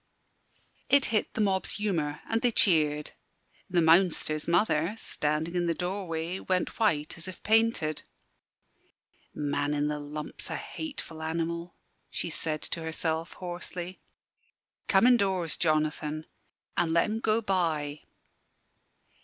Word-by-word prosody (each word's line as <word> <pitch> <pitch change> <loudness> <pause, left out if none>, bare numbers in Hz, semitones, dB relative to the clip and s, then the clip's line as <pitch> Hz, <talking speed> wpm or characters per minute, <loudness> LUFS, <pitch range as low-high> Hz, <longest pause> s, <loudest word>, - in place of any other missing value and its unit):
It 280 -1 +5
hit 215 - 0
the 220 - +1
mob's 190 -2 +1
humour, 165 -8 -1
and 225 0 0
they 245 - +4
cheered. 150 -8 +3 0.6
The 175 -2 +3
Mounster's 160 -2 +3
mother, 170 +1 +2
standing 155 -4 -2
in 175 -1 +1
the 165 - +1
doorway, 180 -1 -3
went 185 +4 -1
white 160 -8 +1
as 165 - -5
if 185 - -9
painted. 220 -8 +2 1.3
"Man 145 0 0
in 145 0 +1
the 150 0 -2
lump's 150 +1 -5
a - - -2
hateful 280 - -6
animal," 170 +2 -3 0.3
she 170 - -3
said 155 -1 -1
to 165 - -3
herself, 160 +1 -1
hoarsely. 180 0 -6 0.9
"Come 195 +3 +5
indoors, 195 -9 +3
Jonathan, 155 -1 0 0.5
an' 165 -2 +1
let 170 - +5
'em 220 +1 -2
go 220 0 +2
by." 160 -8 0
170 Hz, 125 wpm, -29 LUFS, 155-190 Hz, 1.3 s, It